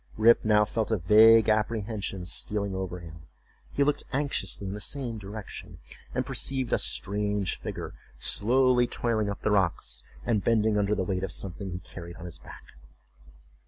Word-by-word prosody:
Rip 115 Hz, +2 st, +5 dB
now 105 Hz, -1 st, +4 dB
felt 110 Hz, +1 st, -2 dB
a 110 Hz, -, +2 dB
vague 110 Hz, +5 st, +6 dB
apprehension 105 Hz, -3 st, -1 dB
stealing 100 Hz, +2 st, -2 dB
over 95 Hz, -2 st, -4 dB
him; 80 Hz, -1 st, -12 dB, 0.4 s
he 140 Hz, -, +2 dB
looked 145 Hz, +1 st, +1 dB
anxiously 135 Hz, -9 st, -1 dB
in 95 Hz, -, -4 dB
the 105 Hz, -, -6 dB
same 120 Hz, -3 st, -3 dB
direction, 105 Hz, +1 st, -8 dB, 0.4 s
and -, -, 0 dB
perceived 130 Hz, -3 st, -2 dB
a -, -, +3 dB
strange 100 Hz, -1 st, 0 dB
figure -, -, -6 dB, 0.2 s
slowly 125 Hz, +2 st, +3 dB
toiling 110 Hz, -4 st, -1 dB
up 100 Hz, -, -5 dB
the 110 Hz, -, +1 dB
rocks, 85 Hz, -11 st, 0 dB, 0.2 s
and 110 Hz, -5 st, +1 dB
bending 110 Hz, -2 st, +2 dB
under 105 Hz, 0 st, +1 dB
the 95 Hz, -, -1 dB
weight 95 Hz, 0 st, -2 dB
of 95 Hz, -, -3 dB
something 95 Hz, +1 st, -6 dB
he 90 Hz, -, -4 dB
carried 85 Hz, -1 st, -10 dB
on 90 Hz, -, -10 dB
his 85 Hz, -, -7 dB
back. -, -, -13 dB
105 Hz, 165 wpm, -28 LUFS, 95-115 Hz, 0.4 s, vague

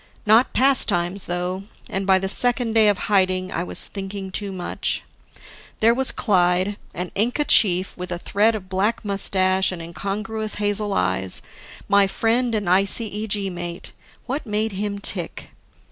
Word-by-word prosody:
Not 220 Hz, +4 st, +4 dB
pastimes, 200 Hz, -9 st, +2 dB
though; 180 Hz, +2 st, -3 dB, 0.2 s
and 195 Hz, 0 st, -4 dB
by 190 Hz, -1 st, +5 dB
the 190 Hz, +1 st, -2 dB
second 245 Hz, +2 st, +4 dB
day 220 Hz, -1 st, +5 dB
of 205 Hz, -2 st, +3 dB
hiding, 185 Hz, -2 st, 0 dB
I 170 Hz, -, -2 dB
was -, -, -2 dB
thinking 195 Hz, -1 st, -7 dB
too 200 Hz, +1 st, -4 dB
much. 180 Hz, -2 st, -3 dB, 0.8 s
There 230 Hz, +1 st, +4 dB
was 265 Hz, +2 st, +3 dB
Clyde, 185 Hz, 0 st, +1 dB, 0.2 s
an 180 Hz, 0 st, -5 dB
Inca 245 Hz, +8 st, 0 dB
chief 185 Hz, -6 st, +4 dB
with 180 Hz, 0 st, -7 dB
a 175 Hz, -, -2 dB
thread 210 Hz, +5 st, +1 dB
of 195 Hz, -3 st, -7 dB
black 200 Hz, +5 st, -1 dB
mustache 190 Hz, -1 st, +2 dB
and 180 Hz, -, -6 dB
incongruous 210 Hz, +6 st, -4 dB
hazel 205 Hz, 0 st, -2 dB
eyes, 95 Hz, +1 st, 0 dB, 0.4 s
my 200 Hz, -1 st, +4 dB
friend 230 Hz, +3 st, 0 dB
and 210 Hz, -2 st, -2 dB
ICEG 200 Hz, +1 st, 0 dB
mate 175 Hz, -1 st, -7 dB, 0.3 s
what 270 Hz, +4 st, -3 dB
made 215 Hz, +1 st, -1 dB
him 200 Hz, +1 st, -3 dB
tick? 190 Hz, -3 st, -4 dB
200 Hz, 150 wpm, -22 LUFS, 185-215 Hz, 0.8 s, by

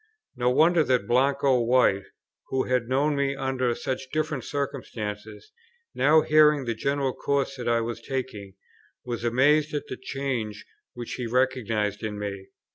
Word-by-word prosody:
No 125 Hz, 0 st, +1 dB
wonder 160 Hz, +5 st, +4 dB
that 130 Hz, -4 st, +1 dB
Blanco 135 Hz, +1 st, +2 dB
White, 115 Hz, -5 st, +3 dB, 0.4 s
who 130 Hz, 0 st, 0 dB
had 125 Hz, -2 st, -1 dB
known 145 Hz, +3 st, +2 dB
me 140 Hz, -1 st, 0 dB
under 130 Hz, -3 st, -1 dB
such 130 Hz, 0 st, -4 dB
different 155 Hz, -4 st, -2 dB
circumstances, 125 Hz, -, -5 dB, 0.4 s
now 150 Hz, +4 st, +4 dB
hearing 150 Hz, -3 st, +4 dB
the 115 Hz, -, -1 dB
general 140 Hz, +3 st, -1 dB
course 140 Hz, -1 st, -1 dB
that 120 Hz, -1 st, -5 dB
I 115 Hz, 0 st, +2 dB
was 115 Hz, 0 st, -4 dB
taking, 115 Hz, -8 st, -5 dB, 0.5 s
was 120 Hz, -1 st, -4 dB
amazed 145 Hz, +6 st, +3 dB
at 145 Hz, -, -3 dB
the 130 Hz, -, -5 dB
change 130 Hz, -6 st, -4 dB, 0.3 s
which 120 Hz, -1 st, -6 dB
he 125 Hz, -, -2 dB
recognized 115 Hz, -5 st, 0 dB
in 105 Hz, -1 st, -4 dB
me. 100 Hz, -2 st, -5 dB
130 Hz, 150 wpm, -26 LUFS, 115-140 Hz, 0.5 s, wonder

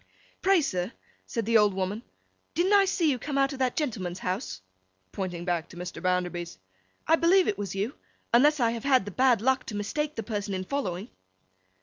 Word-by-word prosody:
'Pray, 385 Hz, -2 st, +4 dB
sir,' 185 Hz, -6 st, -2 dB, 0.4 s
said 230 Hz, -4 st, -2 dB
the 230 Hz, 0 st, +5 dB
old 205 Hz, -2 st, +3 dB
woman, 195 Hz, +3 st, -2 dB, 0.5 s
'didn't 365 Hz, +4 st, +2 dB
I 400 Hz, -1 st, +6 dB
see 345 Hz, -5 st, +2 dB
you 255 Hz, -, -2 dB
come 285 Hz, +1 st, -3 dB
out 275 Hz, +1 st, +2 dB
of 270 Hz, -, -8 dB
that 255 Hz, -2 st, +1 dB
gentleman's 200 Hz, -, -2 dB
house?' 185 Hz, -, -3 dB, 0.5 s
pointing 180 Hz, -3 st, -4 dB
back 175 Hz, -3 st, -1 dB
to -, -, -12 dB
Mr. 180 Hz, -1 st, -6 dB
Bounderby's. 180 Hz, -, -1 dB, 0.5 s
'I 325 Hz, -, +5 dB
believe 360 Hz, +3 st, +4 dB
it 205 Hz, -, -1 dB
was 195 Hz, -2 st, -4 dB
you, 205 Hz, +7 st, -1 dB, 0.4 s
unless 295 Hz, +5 st, +5 dB
I 230 Hz, -2 st, +3 dB
have 230 Hz, -1 st, -5 dB
had 260 Hz, -7 st, +3 dB
the 205 Hz, -, -6 dB
bad 245 Hz, 0 st, +3 dB
luck 260 Hz, 0 st, +2 dB
to 215 Hz, -, -5 dB
mistake 295 Hz, +9 st, -2 dB
the 225 Hz, -, -3 dB
person 205 Hz, -2 st, -3 dB
in 185 Hz, -, -3 dB
following? 200 Hz, -3 st, -3 dB
225 Hz, 200 wpm, -27 LUFS, 185-275 Hz, 0.5 s, I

